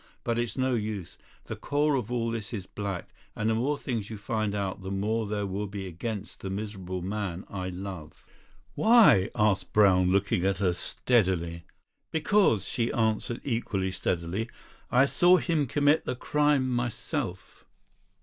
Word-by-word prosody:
But 115 0 0
it's 120 -1 -2
no 130 0 +1
use. 105 -6 -3 0.3
The - - -5
core 145 +1 +1
of 125 -4 -1
all 115 -1 0
this 115 0 -5
is 100 -5 -4
black, 100 -2 -5 0.3
and 105 - -1
the 110 - +3
more 135 +6 0
things 115 -7 -3
you 110 - -6
find 110 -1 -2
out 100 -1 -3
the 95 - -6
more 105 +3 -1
there 105 0 -2
will 100 +2 -3
be 100 -1 -6
against 100 +4 -5
the 95 - -5
miserable 95 -3 -4
man 95 -2 -3
I 95 -2 -3
love." 90 -4 -8 0.5
"Why?" 220 - +6
asked 105 -2 +1
Brown, 95 -3 +5
looking 100 -1 +1
at 95 -2 +1
her 90 -2 +1
steadily. 85 -3 0 0.4
"Because," 160 - +2
she 115 0 -1
answered 110 +1 0
equally 100 -7 -1
steadily, 90 +5 -2 0.4
"I 125 +2 +5
saw 175 +5 +5
him 160 -6 0
commit 145 +4 +3
the - - -2
crime 145 0 +2
myself." 120 - -3
105 Hz, 160 wpm, -28 LUFS, 95-120 Hz, 0.5 s, Why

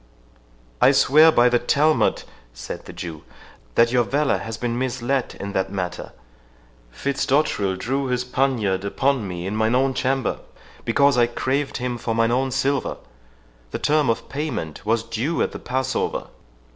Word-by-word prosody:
"I - - +6
swear 155 +4 +6
by 120 -4 +5
the 120 0 +3
Talmud," 150 +6 +2 0.3
said - - -7
the - - -9
Jew, 80 -3 -7 0.5
"that 115 0 +4
your 125 -1 +3
valour 140 +4 +1
has 115 0 -6
been 120 0 -2
misled 130 0 -2
in 100 - -5
that 95 0 -1
matter. 90 -3 -4 0.8
Fitzdotterel 130 - 0
drew 135 +7 -2
his 125 -1 0
poniard 125 -7 0
upon 130 +2 0
me 90 -1 -5
in 100 +3 -3
mine 110 +2 +2
own 135 +1 +2
chamber, 130 -2 -1 0.5
because 140 +2 +3
I 120 - +5
craved 135 +4 -2
him 125 -1 -3
for 115 0 -2
mine 115 0 +2
own 130 +2 +1
silver. 135 +1 -1 0.7
The - - -4
term 150 -2 +2
of 115 - -1
payment 140 - -4
was 115 0 +2
due 130 +10 -2
at - - -2
the - - -7
Passover." 130 +1 -2
125 Hz, 160 wpm, -22 LUFS, 110-135 Hz, 0.8 s, I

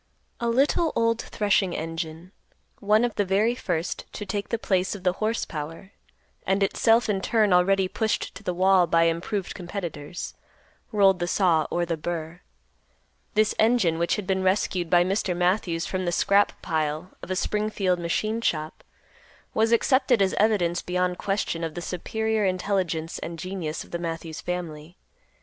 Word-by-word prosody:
A 235 - 0
little 290 +7 +2
old 230 0 +2
threshing 200 -4 +1
engine, 165 +2 -5 0.5
one 215 +3 +3
of 240 - -2
the 205 - +1
very 200 +5 +2
first 175 -8 -3
to 210 - -5
take 200 +1 -3
the 230 - 0
place 190 -3 0
of 190 - -10
the 180 -1 +2
horse 220 +2 0
power, 165 +5 -7 0.5
and 195 +1 +1
itself 225 +4 +3
in 200 -3 0
turn 215 -2 +2
already 190 +1 +4
pushed 220 +3 -1
to - - -10
the - - -2
wall 185 -1 +4
by 165 +1 +4
improved 170 +4 -1
competitors, 175 -4 -6 0.6
rolled 195 -4 +4
the 175 - -1
saw 175 -4 +2
or 175 0 0
the 165 -1 -2
burr. 170 +1 -5 0.9
This 215 0 +3
engine, 215 -8 +3
which 170 - +1
had 210 - -4
been 190 0 0
rescued 185 -2 0
by 175 0 +5
Mr. 185 -1 -1
Matthews 175 -2 +1
from 185 -1 -2
the 175 - 0
scrap 200 +3 +2
pile 155 +2 -2
of - - -9
a 185 - -1
Springfield 200 -2 0
machine 215 +7 -1
shop, 155 -7 -2 0.7
was 225 +1 +2
accepted 255 0 +3
as 195 -1 +2
evidence 190 -5 +2
beyond 180 0 -1
question 195 -4 -1
of 160 -1 -4
the - - -3
superior 220 +5 -1
intelligence 185 -4 -1
and 165 0 -6
genius 170 -2 -4
of - - -18
the 170 - -3
Matthews 165 -1 -5
family. 175 -2 -5
185 Hz, 165 wpm, -25 LUFS, 170-210 Hz, 0.9 s, by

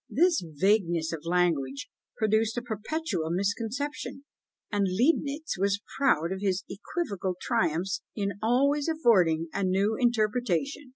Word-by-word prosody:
This 345 +2 +3
vagueness 170 0 +1
of 160 -1 -6
language 155 -6 0 0.3
produced 220 0 +1
a 240 - -2
perpetual 220 - -3
misconception, 230 - -3 0.5
and 205 -2 +1
Leibnitz 280 - 0
was 200 +1 +1 0.2
proud 175 - +2
of 190 0 -4
his 195 -1 0
equivocal 200 - -3
triumphs 190 -5 0
in 200 -2 -1
always 280 +6 +2
affording 185 - +3
a 200 - -1
new 195 +4 +2
interpretation! 245 - 0
205 Hz, 120 wpm, -28 LUFS, 180-250 Hz, 0.5 s, This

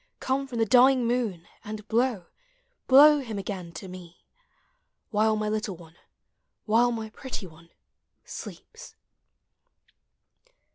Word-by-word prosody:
Come 270 +1 -1
from 245 -3 -6
the 225 - +2
dying 255 +2 +5
moon, 230 -8 -2 0.2
and 215 0 -8
blow, 230 -5 0 0.6
Hlow 295 +3 +8
him 225 -6 -6
again 190 -3 -6
to 190 - -8
me; 180 -2 -12 0.9
While 215 0 +2
my 215 0 -2
little 215 -2 -2
one, 165 -1 -16 0.7
while 235 +3 +3
my 220 -2 -5
pretty 250 -4 -6
one, 165 -1 -16 0.6
sleeps. 470 +2 -10
220 Hz, 115 wpm, -26 LUFS, 190-250 Hz, 0.9 s, Hlow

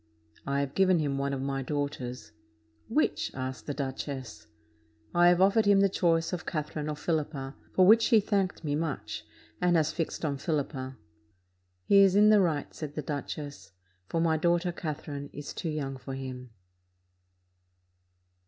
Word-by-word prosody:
"I 140 0 +1
have 140 -1 -3
given 185 -2 +4
him 140 -3 -1
one 140 0 -1
of 135 -1 -3
my 135 0 -2
daughters." 130 -5 -4 0.6
"Which?" 290 +8 +1
asked 130 0 -5
the 145 - -1
duchess. 130 - -5 0.7
"I 175 0 +5
have 175 0 +5
offered 200 +3 +4
him 200 -1 +6
the 195 - +4
choice 165 -2 +1
of 170 -3 -3
Catherine 155 -1 -3
or 150 - -2
Philippa; 150 -4 -2 0.2
for 185 - +5
which 225 +4 +6
he 230 -4 +6
thanked 195 -4 -1
me 145 -2 -1
much, 155 -2 -3 0.3
and 180 -1 +3
has 155 -2 +2
fixed 165 -1 -3
on 140 -2 -1
Philippa." 140 -3 -3 0.9
"He 200 - +6
is 195 -1 +6
in 210 +1 +7
the 210 -1 +6
right," 155 -6 -1
said 150 -2 -7
the 150 - -3
duchess; 145 -4 -6 0.3
"for 165 - -1
my 165 -1 +2
daughter 175 +2 +1
Catherine 145 -4 -5
is 145 0 -7
too 165 - -4
young 140 -3 -3
for 135 +1 -7
him." 130 -2 -7
150 Hz, 160 wpm, -29 LUFS, 140-175 Hz, 0.9 s, in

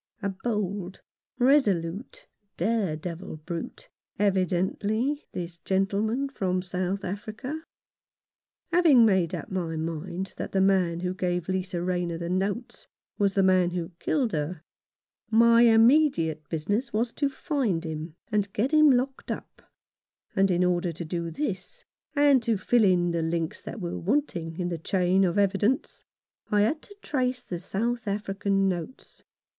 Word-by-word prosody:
A 200 - +1
bold, 195 -2 -3 0.4
resolute, 245 - +1 0.3
dare 195 -3 0
devil 165 +1 -6
brute, 165 +2 -7 0.3
evidently, 200 - 0
this 170 -1 -6
gentleman 200 - 0
from 185 -8 -1
South 185 +1 -2
Africa. 220 - -5 1.1
Having 320 -9 +6
made 190 -6 +2
up - - -7
my 170 -3 -2
mind 170 +4 -4
that - - -5
the 195 - +2
man 185 -3 +2
who 180 0 -1
gave 180 -2 -2
Lisa 185 -2 -2
Rayner 175 -2 -1
the 170 +1 -4
notes 200 +6 -2 0.3
was 200 -1 +2
the 195 - +4
man 185 -2 +4
who 175 0 -4
killed 255 -7 0
her, 155 +1 -3 0.7
my 230 +1 +6
immediate 225 - +4
business 205 - -1
was 230 +2 0
to 285 -2 0
find 265 - -1
him, 160 0 -5 0.2
and 205 -2 0
get 245 +7 0
him 305 -1 +6
locked 265 +1 0
up, - - -7 0.7
and 195 0 +3
in 180 0 +2
order 175 -1 +1
to 165 +1 -6
do 170 +1 -3
this, 295 - -4 0.3
and 285 -3 +5
to 230 -2 +1
fill 235 +4 +3
in 175 -2 +3
the 170 -1 0
links 165 0 -2
that 230 - -7
were 175 -3 -4
wanting 175 - -1
in 175 -1 -1
the 170 -2 -3
chain 185 +2 +2
of 185 +1 +1
evidence, 205 +5 +1 0.5
I 210 -1 +3
had 295 +9 +1
to 405 - -14
trace 255 -3 -1
the 175 - -5
South 225 +5 -2
African 195 -1 0
notes. 180 +7 -5
195 Hz, 145 wpm, -27 LUFS, 175-230 Hz, 1.1 s, Having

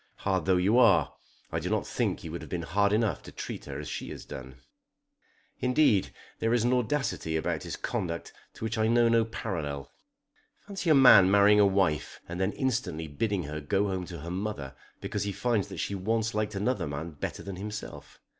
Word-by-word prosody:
Hard 95 -4 -1
though 95 +1 +3
you 100 +7 +3
are, - - +5 0.4
I - - -1
do - - -3
not - - 0
think - - -1
you 80 - -6
would 85 - -5
have - - -10
been 85 -2 -3
hard 100 +4 +2
enough 105 -6 +1
to - - -11
treat - - -6
her 70 0 -6
as 75 - -6
he - - -7
has - - -8
done. 65 -1 -9 1.0
Indeed 125 -6 +3 0.3
there 115 +1 +2
is 120 - +2
an 120 +1 +2
audacity 125 - 0
about 80 - -1
his - - -5
conduct 85 -2 -4 0.2
to - - -9
which 110 0 -2
I 110 - +3
know 120 0 +4
no 115 0 +4
parallel. 80 - -4 0.7
Fancy 195 -4 -3
a 155 - +7
man 125 -8 +8
marrying 100 +1 +6
a 100 - +6
wife 95 -7 0
and 90 +2 -4
then 95 +2 +1
instantly 105 - -2
bidding 95 +5 -1
her 75 +1 -5
go 95 +7 +1
home 95 -2 -3
to 85 -4 -8
her 85 +3 -6
mother 90 -9 -4 0.3
because - - -3
he 100 - -1
finds 115 0 0
that 95 -2 -8
she 100 - -2
once 110 +4 -1
liked 105 0 -1
another 100 -3 0
man 75 +4 -5
better 75 - -5
than 100 -2 -6
himself! 105 +2 -7
100 Hz, 205 wpm, -29 LUFS, 85-115 Hz, 1.0 s, man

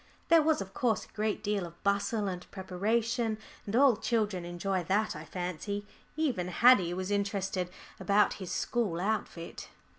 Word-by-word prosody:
There 330 -1 +7
was 310 -5 +2
of 195 0 -7
course 225 -1 +1
a - - -23
great 215 0 -1
deal 205 -2 0
of 170 0 -10
bustle 200 +1 +1
and 180 -1 -5
preparation, 220 +4 -1 0.3
and 200 - -2
all 265 -2 +6
children 210 -7 0
enjoy 180 +2 -2
that, 210 +5 +1
I 155 +1 -7
fancy. 180 +4 -4 0.3
Even 255 - 0
Haddie 185 -3 +5
was 185 +2 -3
interested 200 -3 -1 0.3
about 205 +1 +3
his 185 - -5
school 210 -9 -1
outfit. 190 -4 -3
200 Hz, 155 wpm, -31 LUFS, 180-220 Hz, 0.3 s, There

